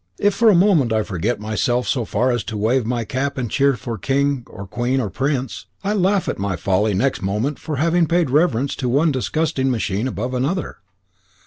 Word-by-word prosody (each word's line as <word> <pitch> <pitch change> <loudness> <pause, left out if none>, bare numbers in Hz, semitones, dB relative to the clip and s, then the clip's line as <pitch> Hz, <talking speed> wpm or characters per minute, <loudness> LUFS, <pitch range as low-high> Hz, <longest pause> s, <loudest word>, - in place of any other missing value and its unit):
If 205 0 +3
for 225 +3 +4
a 205 - +5
moment 170 - +4
I 110 -1 +2
forget 100 +4 -2
myself 115 +3 -1
so 120 -4 0
far 125 +6 +1
as 120 -2 -1
to 110 - -4
wave 115 +3 +1
my 120 -1 -1
cap 140 +2 -2
and 120 -4 -3
cheer 140 -1 +3
for 115 -1 -6
king, 140 +3 0
or 100 - -9
queen, 120 +7 -1
or 105 -6 -2
prince, 135 -2 -2 0.2
I 200 +1 0
laugh 195 -1 +1
at - - -2
my 100 -1 -1
folly 95 +4 +1
next 135 +8 0
moment 105 +9 -1
for 155 - -4
having 165 +4 +2
paid 170 -4 +1
reverence 140 -3 +2
to 125 -3 -1
one 150 +6 +3
digesting 140 0 0
machine 110 -2 -1
above 125 +1 -3
another." 140 +9 -2
130 Hz, 205 wpm, -20 LUFS, 110-150 Hz, 0.2 s, a